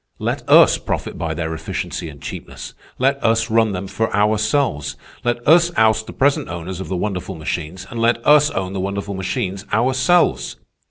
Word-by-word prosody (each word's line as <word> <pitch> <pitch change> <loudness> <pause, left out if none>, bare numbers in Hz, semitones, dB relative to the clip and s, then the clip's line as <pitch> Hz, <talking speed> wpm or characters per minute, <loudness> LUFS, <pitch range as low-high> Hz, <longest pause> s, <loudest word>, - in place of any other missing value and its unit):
Let - - -2
us - - +7
profit - - -4
by 80 -1 -3
their 80 0 -3
efficiency 80 0 -5
and 70 -2 -12
cheapness. 70 - -8 0.2
Let 135 +2 +1
us 115 0 +2
run 110 -1 +3
them 95 0 -4
for 110 +3 -2
ourselves. 105 - +1 0.3
Let 120 0 -2
us 170 +2 +6
oust 110 0 +3
the - - -7
present 140 +1 +1
owners 90 +1 -6
of 95 - -6
the 95 - -3
wonderful 95 -1 -3
machines, 80 +3 -5
and 115 - -6
let 115 +1 +3
us 150 0 +6
own 95 -4 -3
the 95 - -3
wonderful 100 +1 -3
machines 95 0 -3
ourselves. 130 +10 +2
105 Hz, 175 wpm, -20 LUFS, 90-120 Hz, 0.3 s, us